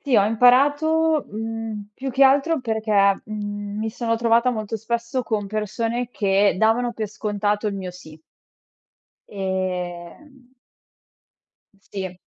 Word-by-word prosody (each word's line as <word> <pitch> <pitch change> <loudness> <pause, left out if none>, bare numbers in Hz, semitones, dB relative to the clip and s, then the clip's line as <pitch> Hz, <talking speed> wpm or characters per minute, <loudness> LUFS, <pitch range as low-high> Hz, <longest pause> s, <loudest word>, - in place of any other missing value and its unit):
Sì, 275 -4 -1
ho 200 - +5
imparato, 290 +8 +3
mhmm, 220 -1 -5
più 265 +4 -5
che 270 +2 +3
altro 275 +3 +4
perché, 215 -4 +2
mhmm, 205 -1 -5
mi 220 0 -2
sono 230 0 -1
trovata 230 +2 +3
molto 220 -2 -3
spesso 235 +4 -2
con 215 -3 -2
persone 225 +3 -2
che 200 -2 +2
davano 225 +4 +2
per 220 -2 -4
scontato 210 0 -2
il 205 - -1
mio 190 -2 -5
sì. 160 -3 -13 1.1
Ehm 190 - -5 1.4
Sì. 185 -2 -5
220 Hz, 120 wpm, -22 LUFS, 205-245 Hz, 1.4 s, ho